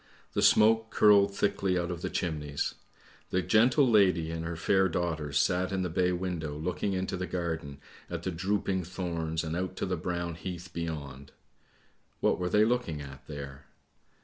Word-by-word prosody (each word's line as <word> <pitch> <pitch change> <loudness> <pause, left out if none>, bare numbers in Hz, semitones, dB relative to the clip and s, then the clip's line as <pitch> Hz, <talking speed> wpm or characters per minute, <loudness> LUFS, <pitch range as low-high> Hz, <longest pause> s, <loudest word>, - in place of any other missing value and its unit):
The - - 0
smoke 110 +1 +5
curled 100 -2 +5
thickly 95 -2 +1
out 85 0 -1
of 85 -1 -5
the - - -2
chimneys. 75 -4 -2 0.6
The 90 0 0
gentle 120 - +4
lady 95 -8 +3
and 80 0 -4
her 85 +1 -4
fair 95 +3 +2
daughters 80 -4 -1
sat 90 +5 +2
in 95 -1 -1
the 90 - -2
bay 90 +2 +2
window 85 -5 -3
looking 90 +5 -2
into 95 0 -2
the 90 0 -3
garden 80 -5 -3 0.3
at - - -5
the 95 - -2
drooping 95 +1 -1
thorns 85 -2 -3
and 80 0 -3
out 95 +1 -3
to - - -2
the 90 -1 -1
brown 85 0 -3
heath 85 +1 -7
beyond. 75 -5 -6 0.9
What - - +2
were 90 0 -1
they 105 +3 +4
looking 115 -10 0
at 70 -2 -10
there? 70 -2 -8
90 Hz, 175 wpm, -29 LUFS, 80-95 Hz, 0.9 s, smoke